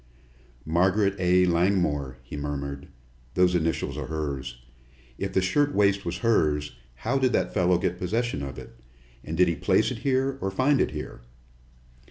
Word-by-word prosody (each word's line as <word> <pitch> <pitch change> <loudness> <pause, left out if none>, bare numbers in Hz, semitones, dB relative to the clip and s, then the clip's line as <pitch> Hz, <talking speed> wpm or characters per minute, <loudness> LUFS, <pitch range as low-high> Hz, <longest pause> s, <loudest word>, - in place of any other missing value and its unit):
"Margaret 95 +5 +2
A. 90 0 +4
Langmore," 85 -7 +1
he - - -9
murmured. 70 -1 -5 0.5
"Those 90 0 +4
initials 80 -3 -1
are - - -5
hers. 70 -6 -4 0.6
If - - -2
the 95 - +2
shirtwaist 100 -3 +2
was 85 0 -3
hers, 75 - +1 0.2
how 135 - -1
did 130 -2 +2
that - - 0
fellow 90 0 +3
get 90 -1 -2
possession 110 -1 -1
of 70 -3 -6
it? - - -10 0.5
And 80 +1 -5
did 90 0 +5
he 85 - +1
place - - +2
it - - -5
here 135 0 0
or 95 - -1
find 130 +8 +2
it - - +1
here?" 75 -5 -7
90 Hz, 160 wpm, -26 LUFS, 75-100 Hz, 0.6 s, did